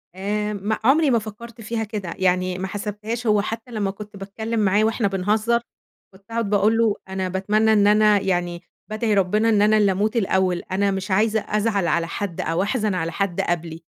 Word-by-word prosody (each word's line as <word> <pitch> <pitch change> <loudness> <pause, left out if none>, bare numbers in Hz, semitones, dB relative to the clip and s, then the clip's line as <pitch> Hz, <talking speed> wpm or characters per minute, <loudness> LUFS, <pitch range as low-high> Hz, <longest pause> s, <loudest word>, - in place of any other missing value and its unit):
آآ، 210 +2 -2
م 205 +2 -2
عمري 285 +5 +4
ما 235 - +3
فكرت 225 +2 -10
فيها 225 +1 -3
كده، 205 -5 -5
يعني 185 0 +1
ما 190 +1 -3
حسبتهاش 210 +4 -5
هو 210 -1 +4
حتّى 225 +3 -6
لمّا 205 -4 -1
كنت 210 +1 -11
باتكلم 220 +4 -4
معاه 205 +1 +3
وإحنا 220 -1 +1
بنهزر 210 +5 +1 0.5
كنت 190 +1 -19
أقعد 230 -2 -1
باقول 210 +2 +3
له: 225 -3 +2
"أنا 190 -1 -2
باتمنى 210 +4 +2
إن 205 -1 +4
أنا 210 0 +5
يعني 175 -2 -2 0.3
بادعي 215 0 0
ربنا 210 +3 +2
إن 210 -2 +3
أنا 215 +1 +4
اللي 205 -2 +3
أموت 205 +4 -1
الأول، 190 -4 +1
أنا 200 +1 +1
مش 190 0 -4
عايزة 215 +3 +2
أزعل 210 -3 0
على 170 0 +1
حد 175 0 -4
أو 165 +2 -1
أحزن 215 -2 -1
على 165 -2 -2
حد 190 0 -1
قبلي،" 165 -1 -3
205 Hz, 195 wpm, -22 LUFS, 190-220 Hz, 0.5 s, أنا